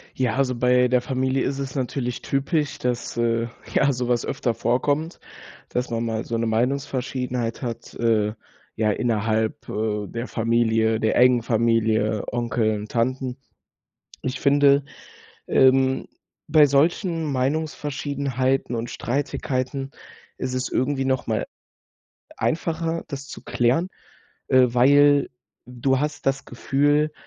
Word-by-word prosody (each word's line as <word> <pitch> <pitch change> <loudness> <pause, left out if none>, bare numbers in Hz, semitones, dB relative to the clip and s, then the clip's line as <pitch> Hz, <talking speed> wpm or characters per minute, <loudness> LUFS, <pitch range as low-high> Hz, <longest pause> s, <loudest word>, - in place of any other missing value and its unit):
Ja, 125 -4 0
also 130 -2 +1
bei 125 +1 +3
der 125 0 +2
Familie 130 +1 0
ist 140 0 -2
es 135 0 -5
natürlich 125 -2 -2
typisch, 140 +2 -1
dass, 125 -1 -2
äh, 115 0 +1 0.3
ja, 140 - +3
so 125 -2 -2
was 120 -1 +1
öfter 130 -3 -1
vorkommt, 145 +8 0 0.5
dass 125 0 -2
man 115 0 -2
mal 110 -1 -2
so 115 - -3
'ne 115 - 0
Meinungsverschiedenheit 125 0 -1
hat, 115 -3 -6
äh, 110 -3 +1 0.4
ja, 110 -1 +1
innerhalb, 110 -1 -1
äh, 105 -1 -2
der 115 +4 -5
Familie 115 -1 +1
der 110 -1 +1
engen 125 -1 +5
Familie, 110 -2 +1
Onkel 115 -2 0
und 105 +1 -8
Tanten. 130 +2 -1 0.9
Ich 130 0 -3
finde, 140 0 +4 0.6
ähm, 130 0 +3 0.4
bei 150 -1 +6
solchen 160 +3 +1
Meinungsverschiedenheiten 135 -2 -1
und 115 +1 -3
Streitigkeiten 135 0 -2 0.5
ist 130 0 -3
es 130 0 -2
irgendwie 135 +1 0
noch 130 -1 0
mal 110 -1 -1 0.9
einfacher, 165 0 -1
das 140 0 -6
zu - - -10
klären, 125 +9 +1 0.6
äh, 130 -1 +6
weil 140 +4 +4 0.4
du 125 +2 0
hast 150 -1 -3
das 135 0 0
Gefühl, 145 +4 +1
130 Hz, 130 wpm, -23 LUFS, 115-140 Hz, 0.9 s, bei